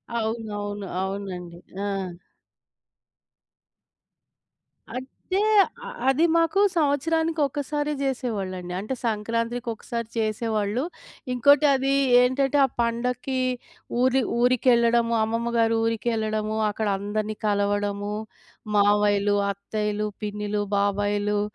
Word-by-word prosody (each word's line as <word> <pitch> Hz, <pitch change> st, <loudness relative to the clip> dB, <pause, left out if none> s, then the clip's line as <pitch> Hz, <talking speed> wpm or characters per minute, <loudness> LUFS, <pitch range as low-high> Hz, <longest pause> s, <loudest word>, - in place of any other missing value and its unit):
అవునవును. 210 Hz, -3 st, -3 dB
అవునండి. 190 Hz, -3 st, -5 dB, 0.3 s
ఆ! 195 Hz, -2 st, -3 dB, 2.8 s
అంటే, 265 Hz, +9 st, -3 dB, 0.4 s
అ -, -, -6 dB, 0.2 s
అది 285 Hz, +5 st, +3 dB
మాకు 330 Hz, +3 st, +2 dB, 0.2 s
సంవత్సరానికొకసారే 295 Hz, -1 st, 0 dB
జేసేవాళ్ళండి. 200 Hz, -9 st, -3 dB
అంటే 215 Hz, +7 st, -4 dB
సంక్రాంతికి 230 Hz, +2 st, -1 dB
ఒకసారి 230 Hz, +1 st, -5 dB
చేసేవాళ్ళు. 215 Hz, +1 st, 0 dB, 0.5 s
ఇంకోటి 285 Hz, +4 st, +5 dB
అదీ 270 Hz, 0 st, +1 dB, 0.3 s
ఏంటటే, 270 Hz, +3 st, +2 dB
ఆ -, -, 0 dB
పండక్కీ 250 Hz, +3 st, -1 dB, 0.6 s
ఊరి 260 Hz, +1 st, +3 dB, 0.2 s
ఊరికెళ్ళడము 235 Hz, -1 st, +3 dB
అమ్మమ్మ 230 Hz, +2 st, -1 dB
గారు 230 Hz, 0 st, +3 dB
ఊరికెళ్ళడము, 220 Hz, -1 st, -1 dB
అక్కడ 215 Hz, +1 st, -2 dB
అందరిని 210 Hz, +2 st, -3 dB
కలవడము, 205 Hz, 0 st, 0 dB, 0.6 s
మావయ్యలు, 205 Hz, 0 st, +3 dB, 0.2 s
అత్తయ్యలు, 210 Hz, +1 st, -2 dB, 0.2 s
పిన్నిలు, 210 Hz, 0 st, -2 dB, 0.2 s
బాబాయిలు 205 Hz, +1 st, +1 dB
220 Hz, 85 wpm, -25 LUFS, 205-250 Hz, 2.8 s, ఇంకోటి